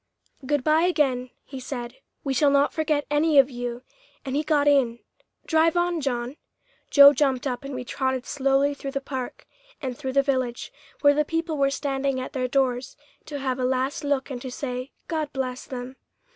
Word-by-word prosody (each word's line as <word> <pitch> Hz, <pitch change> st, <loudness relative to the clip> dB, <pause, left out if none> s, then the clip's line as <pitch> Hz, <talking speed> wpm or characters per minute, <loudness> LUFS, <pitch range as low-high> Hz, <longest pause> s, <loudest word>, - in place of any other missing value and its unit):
"Good 290 Hz, 0 st, 0 dB
bye, 310 Hz, +4 st, +4 dB
again," 265 Hz, -8 st, +1 dB, 0.2 s
he 270 Hz, -, -8 dB
said; 250 Hz, -1 st, -6 dB, 0.3 s
"we 275 Hz, -, -1 dB
shall 285 Hz, +2 st, +4 dB
not 280 Hz, +1 st, +3 dB
forget 305 Hz, -2 st, 0 dB
any 295 Hz, +1 st, +3 dB
of 275 Hz, 0 st, +6 dB
you," 245 Hz, 0 st, -5 dB, 0.4 s
and 265 Hz, 0 st, -3 dB
he 295 Hz, -, +2 dB
got 300 Hz, -2 st, +2 dB
in. 265 Hz, -5 st, +3 dB, 0.5 s
"Drive 325 Hz, +1 st, +3 dB
on, 345 Hz, -1 st, +1 dB
John." 250 Hz, 0 st, -2 dB, 0.5 s
Joe 285 Hz, 0 st, +9 dB
jumped 265 Hz, -2 st, +1 dB
up 255 Hz, 0 st, -2 dB
and 275 Hz, -1 st, -6 dB
we 255 Hz, -, -4 dB
trotted 260 Hz, 0 st, -2 dB
slowly 275 Hz, 0 st, +1 dB
through 275 Hz, -1 st, -6 dB
the 275 Hz, -, 0 dB
park 265 Hz, -2 st, -6 dB, 0.3 s
and 260 Hz, -4 st, -4 dB
through 265 Hz, 0 st, -4 dB
the 275 Hz, 0 st, +4 dB
village, 255 Hz, -3 st, -2 dB, 0.3 s
where 285 Hz, -1 st, +6 dB
the 300 Hz, +1 st, +2 dB
people 325 Hz, +1 st, -2 dB
were 275 Hz, -1 st, +2 dB
standing 275 Hz, -1 st, -1 dB
at 255 Hz, -, -6 dB
their 255 Hz, -1 st, -1 dB
doors 255 Hz, -1 st, 0 dB, 0.3 s
to 295 Hz, -, -5 dB
have 260 Hz, -2 st, -2 dB
a -, -, -1 dB
last 260 Hz, +3 st, 0 dB
look 285 Hz, -1 st, -1 dB
and 245 Hz, -2 st, -5 dB
to 260 Hz, -, -5 dB
say, 250 Hz, 0 st, -5 dB, 0.2 s
"God 310 Hz, -3 st, -2 dB
bless 255 Hz, -2 st, -3 dB
them." 255 Hz, 0 st, -7 dB
275 Hz, 190 wpm, -25 LUFS, 255-290 Hz, 0.5 s, Joe